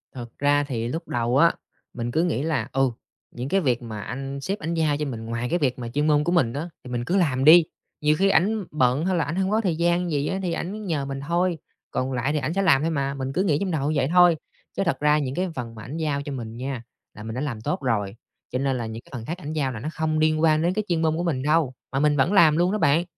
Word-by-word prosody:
Thật 120 -2 -7
ra 145 0 +3
thì 115 -3 -2
lúc 165 +6 -4
đầu 120 +2 0
á, 170 +3 +5 0.4
mình 120 0 -3
cứ 160 +5 +2
nghĩ 150 -6 0
là, 160 -1 -1
ừ, 135 -1 +2 0.4
những 125 +3 -5
cái 195 0 +2
việc 125 -5 +1
mà 110 -3 -6
anh 135 +4 -5
sếp 195 +7 -3
ảnh 165 0 -3
giao 155 -3 +1
cho 150 - -2
mình 115 -5 -5
ngoài 115 +2 -3
cái 175 - +1
việc 130 -4 0
mà 120 - -5
chuyên 145 +5 0
môn 150 -1 +3
của 175 - 0
mình 130 -10 +2
á, 155 +5 -4
thì 125 - -9
mình 120 0 -2
cứ 190 - +1
làm 135 -7 +1
đi, 165 +3 +9 0.4
nhiều 150 0 +3
khi 195 +1 +4
ảnh 200 +5 +2
bận 135 +2 +2
hay 185 - +1
là 165 - +2
ảnh 155 - -3
hông 190 +1 0
có 220 +1 +2
thời 180 -6 0
gian 175 +1 +1
gì 145 0 0
á, 190 - -2
thì 175 -3 -1
ảnh 205 +4 -4
nhờ 150 -6 -1
mình 135 0 -4
thôi, 175 +1 +1 0.3
còn 130 +1 -1
lại 130 +4 0
thì 150 - +1
ảnh 145 +4 -2
sẽ 195 - +1
làm 155 -7 +4
thôi 165 +1 0
mà, 140 -2 -1
mình 135 -1 -4
cứ 185 +6 +1
nghĩ 155 -7 +2
trong 190 0 -2
đầu 150 -2 0
như 155 - -1
vậy 130 - +2
thôi, 175 -2 +7 0.4
chứ - - +2
thật 170 - 0
ra 150 0 +4
những 135 -2 -3
cái 185 0 -1
phần 115 -2 -6
mà 110 - -9
ảnh 145 +7 -6
giao 150 -3 -1
cho 140 0 -6
mình 115 -3 -6
nha, 130 -1 -4 0.3
là 105 - -10
mình 110 +1 -6
đã 130 - -2
làm 120 -7 -3
tốt 180 +7 -2
rồi, 105 -6 -1 0.4
cho 125 - -1
nên 135 -1 0
là 120 - -3
những 110 +1 -6
cái - - -21
phần 115 -2 -6
khác 170 +7 -4
ảnh 155 -3 -6
giao 140 -4 0
là 115 - -6
nó 150 - -4
không 155 -1 0
liên 155 0 +2
quan 155 -1 +4
đến 175 +2 +1
cái 215 - -1
chuyên 170 -3 0
môn 160 0 +1
của 175 - -1
mình 145 -7 -1
đâu, 150 -2 +2 0.2
mà 135 - 0
mình 150 0 +3
vẫn 170 +9 +2
làm 160 -6 +6
luôn 175 +2 +2
đó 215 - 0
bạn. 160 -2 +3
150 Hz, 300 wpm, -24 LUFS, 130-170 Hz, 0.4 s, đi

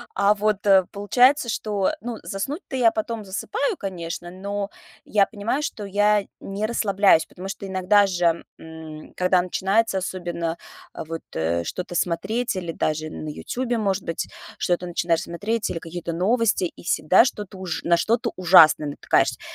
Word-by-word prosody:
А 200 +2 +4
вот, 210 0 0
э, 190 -2 +6
получается, 245 +7 +3
что 205 -3 0
ну 235 -1 -5
заснуть-то 270 - -4
я 235 -3 +4
потом 220 0 -3
засыпаю, 405 - -2
конечно. 175 -3 -5
Но 200 +2 -4 0.4
я 205 -2 +3
понимаю, 230 +8 -2
что 210 -7 -4
я 205 +1 +2 0.2
не 200 +2 -3
расслабляюсь, 200 -6 +3
потому 185 +2 -9
что 195 0 -6
иногда 190 +2 +3
же, 175 -2 +1 0.2
м, 160 -1 -10
когда 180 0 +3
начинается 195 +3 +1
особенно, 175 -2 -3 0.4
а, - - -6
вот, 165 +1 -5
э, 85 +1 0
что-то 175 - -5
смотреть 195 +8 -1
или 170 -3 -4
даже 155 0 -1
на 155 - -6
"Ютубе", 245 +9 -3
может 195 -3 0
быть, 165 - -3 0.3
что-то 180 0 0
начинаешь 170 -1 0
смотреть, 210 +6 -2
или 165 - -3
какие-то 170 +1 -6
новости, 205 +2 +2
и 170 - -8
всегда 170 +1 +2
на - - -1
что-то 205 -6 -5
ужа 185 -3 -4
на 170 - +5
что-то 225 +7 0
ужасное 165 -4 +6
натыкаешься. 145 - +1
190 Hz, 160 wpm, -23 LUFS, 170-210 Hz, 0.4 s, э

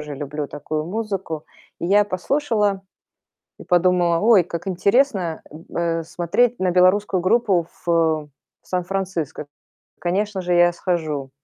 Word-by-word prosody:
люблю 145 +1 -5
такую 155 +2 -4
музыку. 190 -6 -4 0.3
И - - -3
я 205 +3 +5
послушала 210 -1 0 0.8
и - - -9
подумала: 175 -1 +3
"Ой, 210 -2 +5
как 170 +2 -6
интересно, 190 - +1
м, 160 +2 -12
э, 165 -1 0
смотреть 185 +9 0
на 185 -1 +1
белорусскую 185 +1 +3
группу 190 -4 +2 0.2
в, 170 - +1 0.3
э, - - -22 0.4
Сан-Франциско. 180 -5 -3 0.5
Конечно 195 +2 -1
же, 180 0 -1
я 175 0 +5
схожу". 155 -7 -2
180 Hz, 125 wpm, -21 LUFS, 170-200 Hz, 0.8 s, я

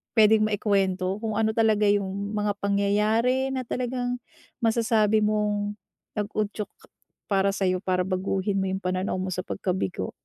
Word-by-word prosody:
pwedeng 215 -1 +6
ma-ikuwento, 195 -2 +1
kung 220 -1 -2
ano 220 0 +2
talaga 215 -2 +3
yung 200 0 0
mga 205 0 +1
pangyayari 210 +6 +2
na 260 - -1
talagang 245 0 -2 0.4
masasabi 220 -2 +3
mong 210 -1 0 0.4
nag-udyok 210 0 -2 0.6
para 195 -2 +2
sa'yo, 185 -2 0
para 185 -1 +1
baguhin 190 +1 -1
mo - - 0
yung 190 - -2
pananaw 185 +1 -1
mo 190 - -2
sa 185 - -2
pagkabigo? 185 - -2
205 Hz, 135 wpm, -26 LUFS, 195-220 Hz, 0.6 s, pwedeng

